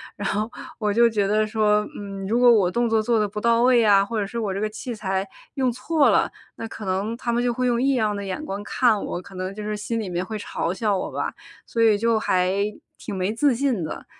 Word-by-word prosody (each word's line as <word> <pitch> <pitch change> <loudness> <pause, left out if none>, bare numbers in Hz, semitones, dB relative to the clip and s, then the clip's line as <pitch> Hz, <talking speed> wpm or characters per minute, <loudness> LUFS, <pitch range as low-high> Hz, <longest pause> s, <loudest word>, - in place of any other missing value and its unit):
然 205 - -3
后 215 +3 -1 0.3
我 210 -2 0
就 235 +3 +5
觉 210 -3 0
得 215 +1 +2
说， 210 -1 +2
嗯， 195 -1 -6
如 230 +4 +1
果 245 -1 +7
我 200 -6 +4
动 240 +3 +1
作 225 -1 +3
做 230 0 +2
得 210 - +1
不 210 +1 -5
到 230 +1 +3
位 250 0 +5
呀， 200 -3 +5
或 220 +2 -3
者 205 - 0
是 235 +4 -5
我 210 -4 -1
这 195 - -3
个 215 - 0
器 235 +3 -6
材 195 -2 -2 0.3
用 260 -2 +1
错 300 +5 +2
了， - - +2 0.2
那 225 - -6
可 220 -1 -8
能 195 +4 -1
他 240 -1 -2
们 235 +1 +1
就 245 -1 +1
会 250 +1 0
用 240 -1 +1
异 275 +1 +3
样 215 -5 +1
的 200 - -4
眼 195 +10 -4
光 205 -7 -5
看 230 -1 +2
我， 175 - -4
可 190 - -14
能 185 +1 -4
就 210 - -7
是 210 0 -3
心 230 +2 -3
里 210 -4 -4
面 175 +1 -2
会 215 +2 -5
嘲 180 - -3
笑 205 0 0
我 - - -4
吧， - - -2 0.4
所 230 - -1
以 215 -2 +4
就 230 0 +2
还 185 -3 +1 0.5
挺 205 - -6
没 190 +2 -1
自 265 +5 +2
信 245 -7 0
的， 155 - -6
215 Hz, 280 characters per minute, -23 LUFS, 200-235 Hz, 0.5 s, 果